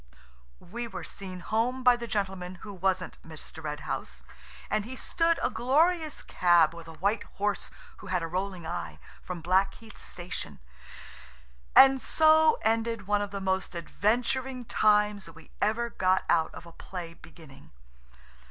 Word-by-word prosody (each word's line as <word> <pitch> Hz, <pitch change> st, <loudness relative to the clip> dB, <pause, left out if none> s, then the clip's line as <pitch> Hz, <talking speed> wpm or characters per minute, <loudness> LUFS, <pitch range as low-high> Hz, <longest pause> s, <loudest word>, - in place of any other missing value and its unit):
We 235 Hz, +2 st, -4 dB
were 190 Hz, -5 st, -7 dB
seen 185 Hz, -2 st, -8 dB
home 240 Hz, +6 st, -1 dB
by 250 Hz, -1 st, +7 dB
the 235 Hz, -1 st, -6 dB
gentleman 190 Hz, -4 st, -3 dB
who 205 Hz, -, -7 dB
wasn't 185 Hz, 0 st, -1 dB
Mr. 160 Hz, 0 st, -11 dB
Red 150 Hz, -1 st, -4 dB
House, -, -, -5 dB, 0.4 s
and 215 Hz, -, 0 dB
he 250 Hz, +5 st, -8 dB
stood 335 Hz, +5 st, +1 dB
a -, -, +1 dB
glorious 315 Hz, +5 st, +1 dB
cab 170 Hz, -3 st, +4 dB
with 170 Hz, -1 st, -10 dB
a 165 Hz, -, -9 dB
white 200 Hz, +4 st, +1 dB, 0.2 s
horse 205 Hz, 0 st, -1 dB, 0.3 s
who 200 Hz, -, -12 dB
had 180 Hz, -2 st, 0 dB
a -, -, -2 dB
rolling 185 Hz, 0 st, -3 dB
eye, 175 Hz, +2 st, -5 dB, 0.2 s
from 180 Hz, -2 st, -6 dB
Blackheath 195 Hz, +5 st, 0 dB
Station, 175 Hz, -2 st, -7 dB, 1.2 s
and 270 Hz, -1 st, +8 dB
so 315 Hz, 0 st, +5 dB
ended 225 Hz, -1 st, 0 dB
one 205 Hz, +1 st, +1 dB
of 205 Hz, -, -3 dB
the 200 Hz, 0 st, -5 dB
most 190 Hz, -1 st, -1 dB
adventuring 245 Hz, +8 st, -1 dB
times 210 Hz, -3 st, +2 dB
we 165 Hz, 0 st, -15 dB
ever 235 Hz, +2 st, +1 dB
got 185 Hz, 0 st, +2 dB
out 160 Hz, -2 st, +2 dB
of -, -, -10 dB
a 170 Hz, -, -12 dB
play 170 Hz, 0 st, -8 dB
beginning. 160 Hz, -3 st, -16 dB
200 Hz, 150 wpm, -28 LUFS, 175-235 Hz, 1.2 s, and